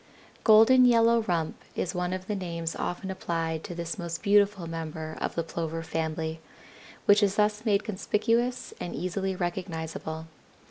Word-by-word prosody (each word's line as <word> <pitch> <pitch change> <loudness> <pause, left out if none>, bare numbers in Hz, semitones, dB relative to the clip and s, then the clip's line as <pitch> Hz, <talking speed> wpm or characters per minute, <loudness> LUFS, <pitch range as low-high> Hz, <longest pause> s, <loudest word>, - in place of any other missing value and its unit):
Golden 225 +4 +7
yellow 230 -1 +5
rump 170 -6 -2
is 180 - -2
one 180 -1 -1
of 185 0 -4
the 210 - -2
names 170 -3 -3
often 190 +2 -3
applied 165 -3 -2
to 175 - -6
this 170 0 -4
most 170 +1 -4
beautiful 200 -3 +3
member 160 -1 -5
of - - -2
the 170 - 0
Plover 165 0 -4
family, 160 0 -3 0.7
which 205 +1 +6
is 200 -1 +2
thus 210 +1 +1
made 205 -2 +3
conspicuous 230 +4 0
and 175 - -5
easily 190 +4 -2
recognizable. 160 -3 -4
180 Hz, 150 wpm, -28 LUFS, 165-210 Hz, 0.7 s, Golden